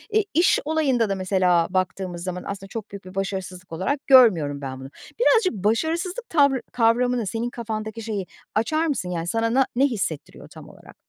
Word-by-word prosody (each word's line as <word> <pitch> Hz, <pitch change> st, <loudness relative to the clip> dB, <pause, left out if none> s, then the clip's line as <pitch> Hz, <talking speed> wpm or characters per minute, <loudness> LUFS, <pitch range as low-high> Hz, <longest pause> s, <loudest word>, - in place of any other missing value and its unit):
E, 435 Hz, -, +4 dB
iş 340 Hz, +3 st, +4 dB
olayında 275 Hz, -8 st, +1 dB
da 195 Hz, -, 0 dB
mesela 185 Hz, -3 st, +2 dB
baktığımız 185 Hz, -1 st, -2 dB
zaman 180 Hz, -1 st, -4 dB
aslında 195 Hz, -1 st, -6 dB
çok 215 Hz, +1 st, -7 dB
büyük 200 Hz, -1 st, -9 dB
bir 185 Hz, 0 st, -11 dB
başarısızlık 190 Hz, -2 st, -4 dB
olarak 230 Hz, -, -2 dB
görmüyorum 175 Hz, -, +5 dB
ben 130 Hz, -1 st, -6 dB
bunu. 135 Hz, 0 st, -9 dB, 0.3 s
Birazcık 460 Hz, -5 st, +4 dB
başarısızlık 320 Hz, -, -1 dB
tavrı 280 Hz, -5 st, +3 dB
kavramını 240 Hz, 0 st, +2 dB
senin 230 Hz, +3 st, -2 dB
kafandaki 220 Hz, -1 st, -5 dB
şeyi 210 Hz, -4 st, -3 dB, 0.3 s
açar 310 Hz, +9 st, +1 dB
mısın, 220 Hz, -11 st, -2 dB
yani, 170 Hz, -1 st, -3 dB
sana 225 Hz, +4 st, 0 dB
na 265 Hz, +1 st, +4 dB
ne 270 Hz, +3 st, +4 dB
hissettiriyor 190 Hz, -, -4 dB
tam -, -, -13 dB
olarak? -, -, -16 dB
220 Hz, 175 wpm, -23 LUFS, 185-260 Hz, 0.3 s, görmüyorum